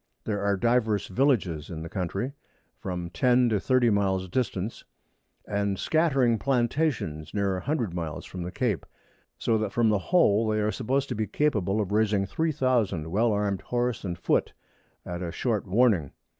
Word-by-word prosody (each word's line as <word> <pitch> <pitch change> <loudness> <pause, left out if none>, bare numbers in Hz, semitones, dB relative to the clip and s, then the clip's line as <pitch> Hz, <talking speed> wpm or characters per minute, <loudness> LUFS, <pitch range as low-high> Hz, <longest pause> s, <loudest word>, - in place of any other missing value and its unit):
There 100 -2 -2
are 100 0 +1
divers 110 -2 +1
Villages 95 - +1
in 80 -3 -6
the - - -6
Country, 95 +9 -3 0.5
from 90 -2 -4
10 125 0 +3
to 105 -3 +1
30 125 +1 +3
Miles 95 -2 +1
distance, 110 -2 -2 0.6
and 100 -1 -1
scattering 135 - +2
Plantations 120 - -1
near 100 -2 +1
a 90 - -4
hundred 125 - -1
Miles 80 -4 -4
from 90 - -7
the 85 - -4
Cape; 115 - -1 0.5
so 115 -1 +1
that 105 -2 -2
from 115 0 +2
the 105 -2 +2
whole 115 - +4
they 110 0 +1
are 105 0 +1
supposed 135 +4 -1
to - - -2
be 110 0 -1
capable 105 -6 0
of 100 -2 -2
raising 105 -2 +2
3000 120 - 0
well 110 +4 +2
armed 100 -2 0
Horse 120 -1 -1
and 90 -3 -3
Foot 85 - 0 0.5
at 85 0 -5
a 85 -2 -3
short 110 -2 -1
warning. 100 - +2
105 Hz, 170 wpm, -27 LUFS, 95-125 Hz, 0.6 s, whole